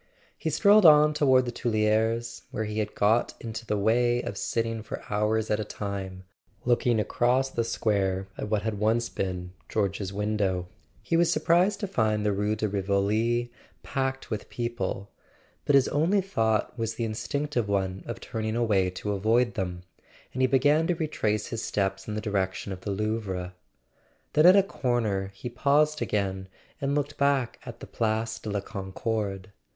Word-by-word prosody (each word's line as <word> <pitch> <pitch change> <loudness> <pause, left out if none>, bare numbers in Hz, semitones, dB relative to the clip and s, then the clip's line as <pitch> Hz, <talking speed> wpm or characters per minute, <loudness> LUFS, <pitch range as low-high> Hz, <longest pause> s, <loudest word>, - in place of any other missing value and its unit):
He - - -3
strolled 210 0 +5
on 150 -2 +7
toward 130 -4 +4
the 120 - -3
Tuileries, 115 0 0
where 110 - -3
he 105 0 -3
had 105 0 -3
got 110 +3 +2
into 115 0 -6
the 105 - 0
way 120 +4 +2
of 100 - -5
sitting 115 +2 -2
for 110 - -7
hours 105 +1 +1
at 105 - +2
a - - -1
time, 100 -3 -5 0.4
looking 120 -1 +2
across 125 +5 +1
the 115 - 0
square 100 -4 0
at 105 - -5
what 105 -1 0
had 110 -2 -2
once 115 +2 +1
been 90 -1 -4 0.2
George's 100 -2 -1
window. 100 -3 -1 0.4
He - - 0
was 170 0 +4
surprised 175 +5 +3
to 200 - -1
find 110 - 0
the 105 - +3
Rue 105 +2 0
de 110 0 -1
Rivoli 105 +5 0 0.3
packed 135 0 -3
with 105 - -4
people; 120 -4 -3 0.5
but 145 - +4
his 135 -2 +5
only 165 +8 +2
thought 110 - 0
was 115 0 -2
the 115 - -2
instinctive 120 +2 -2
one 95 -1 -1
of 115 - -5
turning 110 -1 -3
away 105 -6 +2
to 95 +3 -4
avoid 115 +4 +2
them, 90 -1 -4 0.5
and 130 - -2
he 130 - +5
began 145 +5 +3
to 175 - +1
retrace 110 -10 -1
his 115 - -3
steps 95 -3 -2
in 105 - -3
the 110 - -2
direction 100 -2 -2
of 95 - -9
the 105 - -5
Louvre. 100 -3 -2 0.8
Then 155 +3 +6
at 185 - +9
a 200 - +6
corner 115 - -1
he 125 - -7
paused 150 +5 +2
again 95 -2 -1 0.3
and 140 +1 0
looked 145 0 -2
back 140 -4 +1
at 120 -1 -9
the - - -6
Place 110 0 -1
de 110 - -6
la 100 -1 -1
Concorde. 100 0 -4
110 Hz, 175 wpm, -27 LUFS, 100-125 Hz, 0.8 s, at